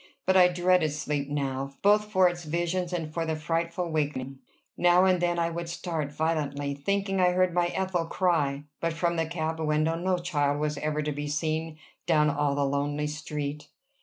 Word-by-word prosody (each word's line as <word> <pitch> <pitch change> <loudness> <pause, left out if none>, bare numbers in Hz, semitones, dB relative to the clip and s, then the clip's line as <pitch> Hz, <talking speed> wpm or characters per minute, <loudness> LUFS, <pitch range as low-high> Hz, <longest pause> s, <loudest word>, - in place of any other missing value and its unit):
But 190 - +3
I 180 -1 +8
dreaded 180 -2 +2
sleep 145 -2 -2
now, 140 -1 -3
both 210 +1 +5
for 190 -3 +4
its 175 0 -3
visions 175 +3 -1
and 165 -3 -3
for 165 - -1
the 160 -1 -1
frightful 170 +2 -2
waking. 140 -4 -2 0.4
Now 175 +1 +5
and 185 -2 +3
then 175 0 +1
I 170 0 0
would 170 0 -4
start 165 -4 -3
violently, 145 -3 -1
thinking 195 +6 -1
I 180 0 +4
heard 185 -1 +2
my 175 0 +2
Ethel 180 -2 -1
cry; 150 -7 +1 0.2
but 165 -1 -1
from 170 +1 0
the 165 -1 0
cab 160 -1 -3
window 155 +1 +1
no 180 +2 0
child 145 -5 0
was 150 -1 -1
ever 150 0 -1
to 150 - -1
be 145 0 -4
seen, 155 +1 -2 0.3
down 150 -3 +4
all 145 0 0
the 140 0 +1
lonely 145 +2 -1
street. 150 -1 -4
160 Hz, 190 wpm, -27 LUFS, 150-175 Hz, 0.4 s, I